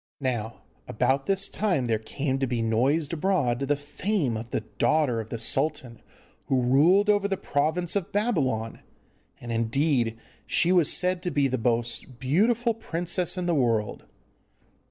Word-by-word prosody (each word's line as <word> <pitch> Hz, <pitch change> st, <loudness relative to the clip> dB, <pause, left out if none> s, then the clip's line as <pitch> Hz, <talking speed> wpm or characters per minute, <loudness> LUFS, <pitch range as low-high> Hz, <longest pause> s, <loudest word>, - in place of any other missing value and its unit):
Now 120 Hz, -5 st, -3 dB, 0.2 s
about 135 Hz, +1 st, 0 dB
this 195 Hz, 0 st, +1 dB
time 185 Hz, -12 st, 0 dB
there 115 Hz, -2 st, 0 dB
came 135 Hz, +4 st, -3 dB
to 135 Hz, -, 0 dB
be 120 Hz, -2 st, -1 dB
noised 135 Hz, +8 st, +1 dB
abroad 155 Hz, -8 st, +1 dB
the 140 Hz, +1 st, +1 dB
fame 145 Hz, -, -2 dB
of 110 Hz, +2 st, -6 dB
the -, -, -2 dB
daughter 125 Hz, +2 st, +1 dB
of 110 Hz, 0 st, -6 dB
the 115 Hz, -, -4 dB
sultan 125 Hz, 0 st, -2 dB, 0.5 s
who 130 Hz, -, +2 dB
ruled 165 Hz, +11 st, +4 dB
over 205 Hz, -1 st, +3 dB
the 195 Hz, -1 st, -1 dB
province 160 Hz, +5 st, -1 dB
of 195 Hz, -4 st, -2 dB
Babylon, 140 Hz, -, -1 dB, 0.6 s
and 120 Hz, -, -7 dB
indeed 115 Hz, 0 st, 0 dB, 0.3 s
she 175 Hz, -, +2 dB
was 175 Hz, -5 st, +4 dB
said 180 Hz, 0 st, 0 dB
to 180 Hz, -, -2 dB
be 140 Hz, -3 st, +2 dB
the 130 Hz, -1 st, -2 dB
most 120 Hz, +2 st, -2 dB
beautiful 220 Hz, -, +2 dB
princess 175 Hz, -3 st, -2 dB
in 180 Hz, -, -2 dB
the 175 Hz, -, +1 dB
world. 115 Hz, -7 st, 0 dB
140 Hz, 155 wpm, -26 LUFS, 120-180 Hz, 0.6 s, ruled